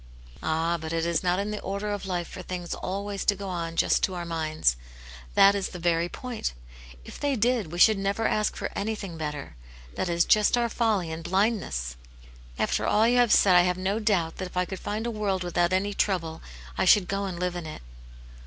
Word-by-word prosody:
" - - -20
Ah, 165 +2 0
but 160 0 -4
it 165 0 0
is 170 -1 +1
not 180 0 +1
in 200 +2 -2
the 210 - -4
order 200 +2 -3
of 205 -1 -4
life 175 -2 -2
for - - -8
things 180 -1 -5
always 200 +1 -4
to 205 - +3
go 200 0 -7
on 165 -2 -4
just - - +2
to 190 - 0
our 175 -1 -4
minds. 155 - 0 0.6
That 200 +1 +7
is 200 -2 -2
the 180 - -8
very 170 0 +1
point. 240 - -4 0.5
If - - -10
they 285 -1 0
did, 230 -6 +1
we 175 - -5
should 215 +3 +6
never 200 +3 0
ask 215 0 0
for - - -4
anything 200 -4 -3
better. 150 - -5 0.4
That 185 - -2
is 170 0 +2
just 215 +2 +4
our 235 -1 +1
folly 215 -8 0
and 160 +1 -6
blindness." 175 - 0 0.6
"After - - 0
all 220 +2 +4
you 245 +1 +3
have 240 -3 +4
said 190 -3 +6
I 175 - +8
have 180 0 +1
no 195 +3 -1
doubt 195 -7 0
that 185 - -4
if 180 - -10
I 180 - +2
could 190 0 -6
find 215 +2 -3
a 235 - -1
world 200 -4 -1
without 175 0 +1
any 195 +2 +1
trouble, 170 -6 -1 0.4
I - - +3
should 200 -4 +6
go 200 0 -1
and 180 -3 -5
live 180 0 -1
in 175 -2 -5
it." 155 - -8
185 Hz, 225 wpm, -27 LUFS, 170-205 Hz, 0.6 s, I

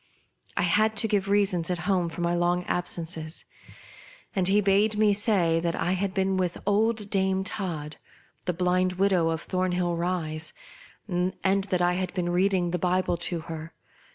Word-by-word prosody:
I - - +2
had 215 +5 +2
to 220 - +4
give 200 -2 0
reasons 195 -4 +2
at 180 - 0
home 180 -3 +1
for 165 +1 -6
my 170 0 +1
long 175 +1 +1
absences, 165 -2 -2 0.9
and 185 -2 +1
he 200 +2 +4
bade 205 +2 +2
me 210 -1 +4
say 195 -6 +2
that 170 0 -1
I 175 - -1
had 190 +1 -1
been 190 0 0
with 180 -2 -1
old 210 +1 +1
Dame 190 -1 +1
Todd, 160 -7 -4 0.5
the 180 - 0
blind 180 +1 +1
widow 185 -3 +2
of 165 0 -2
Thornhill 180 -2 0
Rise, 165 -3 -3 0.5
and 180 0 -1
that 190 -1 +1
I 175 0 +3
had 185 +1 -3
been 175 -2 -1
reading 180 -1 +1
the 180 - -1
Bible 180 0 +1
to 170 0 -1
her. 160 0 -8
180 Hz, 170 wpm, -26 LUFS, 175-195 Hz, 0.9 s, to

